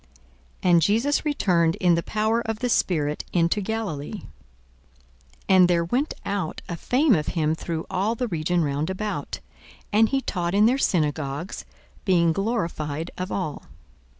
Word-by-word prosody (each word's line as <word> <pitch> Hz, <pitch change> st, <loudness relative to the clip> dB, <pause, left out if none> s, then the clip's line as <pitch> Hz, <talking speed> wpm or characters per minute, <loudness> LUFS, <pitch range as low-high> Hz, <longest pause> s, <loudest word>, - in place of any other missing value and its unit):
42:004:014 180 Hz, -, +3 dB
And 170 Hz, -1 st, +6 dB
Jesus 230 Hz, -, +2 dB
returned 175 Hz, -, +2 dB
in 180 Hz, -2 st, +3 dB
the 170 Hz, -, +2 dB
power 220 Hz, +5 st, 0 dB
of 225 Hz, -2 st, -3 dB
the 245 Hz, +3 st, -2 dB
Spirit 150 Hz, -9 st, 0 dB
into 170 Hz, +4 st, +2 dB
Galilee: 205 Hz, -4 st, -4 dB, 1.2 s
and 185 Hz, -1 st, +6 dB
there 170 Hz, -1 st, +2 dB
went 255 Hz, -, -1 dB
out 200 Hz, -5 st, -3 dB
a 170 Hz, -, -4 dB
fame 255 Hz, -, +2 dB
of 155 Hz, -5 st, 0 dB
him 155 Hz, -1 st, +2 dB
through 160 Hz, 0 st, -4 dB
all 200 Hz, +4 st, 0 dB
the 245 Hz, +1 st, -2 dB
region 170 Hz, -2 st, 0 dB
round 145 Hz, +2 st, -1 dB
about. 205 Hz, +2 st, -4 dB, 0.5 s
42:004:015 210 Hz, -, +4 dB
And 225 Hz, -1 st, +5 dB
he 270 Hz, -1 st, +1 dB
taught 175 Hz, -5 st, -2 dB
in 210 Hz, +1 st, +5 dB
their 255 Hz, +4 st, +3 dB
synagogues, 150 Hz, -, -1 dB, 0.4 s
being 170 Hz, -4 st, +3 dB
glorified 165 Hz, -7 st, -2 dB
of 185 Hz, +1 st, -5 dB
all. 180 Hz, -7 st, -3 dB
180 Hz, 155 wpm, -24 LUFS, 165-220 Hz, 1.2 s, And